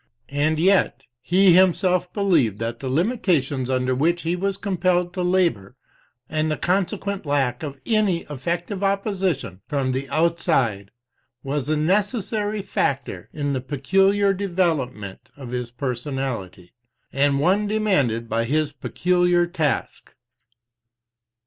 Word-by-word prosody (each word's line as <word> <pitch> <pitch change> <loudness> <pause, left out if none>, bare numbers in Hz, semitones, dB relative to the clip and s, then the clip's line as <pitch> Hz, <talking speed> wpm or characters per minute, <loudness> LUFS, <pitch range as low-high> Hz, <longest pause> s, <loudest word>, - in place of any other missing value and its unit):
And 145 +3 +1
yet, 185 -5 +2 0.2
he 180 +6 +4
himself 180 0 +3
believed 165 - +2
that 115 +1 -4
the 130 - -4
limitations 150 - 0
under 130 0 +1
which 165 +7 +1
he 170 +2 0
was 195 +2 -1
compelled 180 -2 0
to 185 - -3
labor, 175 - +1 0.5
and 155 0 -1
the 155 - -1
consequent 195 +2 -1
lack 135 -5 0
of 140 -3 -6
any 210 -6 +1
effective 175 - -4
opposition 190 - -1
from 135 -3 -1
the 135 +1 -3
outside, 155 - +1 0.5
was 140 +1 -2
a 155 - +2
necessary 205 +4 0
factor 135 - -2
in 145 -2 -2
the 130 - -2
peculiar 195 +9 +2
development 160 - -2
of 130 -4 -8
his 125 -1 -3
personality, 120 - -4 0.4
and 140 0 +2
one 190 +7 +2
demanded 145 - +1
by 115 +1 0
his 150 +3 0
peculiar 175 +3 +1
task. 160 -6 -3
160 Hz, 125 wpm, -23 LUFS, 130-185 Hz, 0.5 s, he